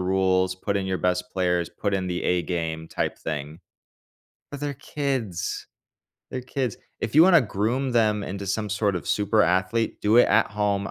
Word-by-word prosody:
rules, 95 Hz, 0 st, +2 dB
put 100 Hz, +2 st, -2 dB
in 100 Hz, -, -1 dB
your 95 Hz, -1 st, -1 dB
best 90 Hz, 0 st, 0 dB
players, 90 Hz, -2 st, +1 dB
put 100 Hz, -2 st, -2 dB
in 95 Hz, -1 st, -1 dB
the 90 Hz, 0 st, -2 dB
A 90 Hz, -1 st, +2 dB
game 80 Hz, -2 st, -3 dB
type -, -, -2 dB
thing. 75 Hz, +2 st, -5 dB, 0.9 s
But 145 Hz, -1 st, -7 dB
they're 145 Hz, -1 st, -3 dB
kids. 130 Hz, -, -3 dB, 0.6 s
They're 130 Hz, -, -3 dB
kids. 130 Hz, -3 st, -3 dB, 0.2 s
If 110 Hz, -, -3 dB
you 155 Hz, -, +8 dB
wanna 175 Hz, -3 st, +7 dB
groom 120 Hz, +5 st, -1 dB
them 105 Hz, -3 st, +2 dB
into 100 Hz, +1 st, -5 dB
some 105 Hz, +2 st, -1 dB
sort 100 Hz, -2 st, 0 dB
of 85 Hz, -, -6 dB
super 105 Hz, +1 st, +2 dB
athlete, 95 Hz, +6 st, 0 dB
do 105 Hz, +2 st, +3 dB
it 120 Hz, -, +7 dB
at -, -, +4 dB
home 100 Hz, -1 st, -1 dB
100 Hz, 180 wpm, -25 LUFS, 90-115 Hz, 0.9 s, you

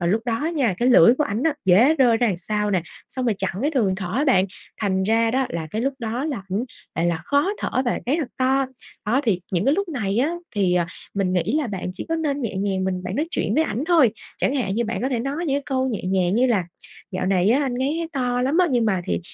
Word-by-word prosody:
và 170 Hz, -, -1 dB
lúc 215 Hz, +6 st, +1 dB
đó 240 Hz, +6 st, -1 dB
nha, 280 Hz, -, +1 dB
cái 245 Hz, -, +2 dB
lưỡi 245 Hz, -1 st, +7 dB
của 300 Hz, +3 st, +1 dB
ảnh 220 Hz, 0 st, -2 dB
á, 320 Hz, -3 st, +2 dB
dễ 210 Hz, -, +5 dB
rơi 250 Hz, -6 st, +4 dB
ra 240 Hz, -, +2 dB
đằng 195 Hz, -6 st, 0 dB
sau 210 Hz, +3 st, -1 dB
nè, 185 Hz, -4 st, +1 dB, 0.3 s
xong 255 Hz, -1 st, -4 dB
rồi 225 Hz, -, +2 dB
chặn 190 Hz, -1 st, -2 dB
cái 295 Hz, -, +2 dB
đường 225 Hz, -11 st, +1 dB
thở 185 Hz, -2 st, -5 dB
á 290 Hz, -, +2 dB
bạn, 190 Hz, -10 st, +4 dB, 0.4 s
thành 190 Hz, -2 st, +1 dB
ra 225 Hz, +3 st, +2 dB
đó 265 Hz, +1 st, +1 dB
là 165 Hz, -2 st, -4 dB
cái 220 Hz, +5 st, -2 dB
lúc 275 Hz, +2 st, 0 dB
đó 235 Hz, +4 st, -3 dB
là 265 Hz, -11 st, -3 dB
ảnh 205 Hz, +6 st, 0 dB, 0.3 s
lại 170 Hz, -, 0 dB
là 165 Hz, -2 st, 0 dB
khó 285 Hz, +6 st, +2 dB
thở -, -, -3 dB
và 240 Hz, -, -1 dB
ngáy 280 Hz, +5 st, +2 dB
thật 280 Hz, -, -3 dB
to. 265 Hz, +1 st, +2 dB, 0.4 s
Đó, 245 Hz, +5 st, +2 dB
thì 200 Hz, -8 st, +1 dB
những 180 Hz, +1 st, +1 dB
cái 275 Hz, +4 st, +4 dB
lúc 400 Hz, 0 st, -1 dB
này 220 Hz, -9 st, -1 dB
á 305 Hz, +7 st, +1 dB, 0.2 s
thì, 190 Hz, -3 st, +2 dB
à, 175 Hz, -1 st, +2 dB, 0.3 s
mình 195 Hz, -2 st, 0 dB
nghĩ 180 Hz, -2 st, +2 dB, 0.2 s
là 295 Hz, -, -1 dB
bạn 190 Hz, -3 st, -4 dB
chỉ -, -, -6 dB
có 330 Hz, -, 0 dB
nên 290 Hz, -3 st, -1 dB
nhẹ 205 Hz, -4 st, -3 dB
nhàng 190 Hz, -1 st, -1 dB
mình 185 Hz, -1 st, -2 dB
bạn 185 Hz, +2 st, -4 dB
nói 300 Hz, -, 0 dB
chuyện -, -, -1 dB
với 315 Hz, -, +3 dB
ảnh 250 Hz, +1 st, -2 dB
thôi, 320 Hz, -10 st, +5 dB, 0.3 s
chẳng 275 Hz, -, +1 dB
hạn 205 Hz, -8 st, -1 dB
như 235 Hz, +1 st, 0 dB
bạn 225 Hz, +2 st, -3 dB
có 260 Hz, -, +1 dB
thể 250 Hz, -4 st, -1 dB
nói 275 Hz, +5 st, -3 dB
những 275 Hz, -, +1 dB
cái 285 Hz, -, -3 dB
câu 260 Hz, 0 st, 0 dB
nhẹ 225 Hz, -5 st, -3 dB
nhàng 185 Hz, 0 st, +1 dB
như 250 Hz, +3 st, +3 dB
là 215 Hz, -8 st, +1 dB, 0.5 s
"Dạo 185 Hz, -1 st, -2 dB
này 190 Hz, +1 st, +3 dB
á 275 Hz, +5 st, +3 dB
anh 255 Hz, -3 st, -1 dB
ngáy 275 Hz, +4 st, 0 dB
thấy 335 Hz, -, -3 dB
to 250 Hz, -2 st, 0 dB
lắm 280 Hz, +6 st, +1 dB
á, 365 Hz, -, +5 dB
nhưng 240 Hz, -3 st, +2 dB
mà 195 Hz, -4 st, +1 dB
thì, -, -, -1 dB
235 Hz, 280 wpm, -23 LUFS, 195-275 Hz, 0.5 s, lưỡi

